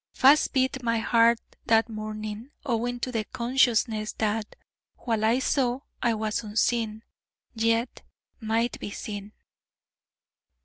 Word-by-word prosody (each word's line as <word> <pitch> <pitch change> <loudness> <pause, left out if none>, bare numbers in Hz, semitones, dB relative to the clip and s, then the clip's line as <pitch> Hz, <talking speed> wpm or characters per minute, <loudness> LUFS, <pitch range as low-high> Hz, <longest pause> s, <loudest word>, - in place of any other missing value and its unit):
Fast 280 +3 +5
beat 265 0 +1
my 230 -1 +1
heart 230 +1 +4 0.3
that 225 0 +4
morning, 215 +1 -6 0.2
owing 245 -1 -1
to 255 - -2
the 225 -3 -1
consciousness 235 -2 +1
that, 215 0 -2 0.4
while 225 -3 -1
I 225 +3 +4
saw, 260 -1 0 0.2
I 235 -2 +2
was 215 0 -1
unseen, 220 0 0 0.5
yet 230 +1 0 0.4
might 230 +1 -1
be - - -5
seen. 205 0 -7
230 Hz, 120 wpm, -27 LUFS, 215-245 Hz, 0.5 s, Fast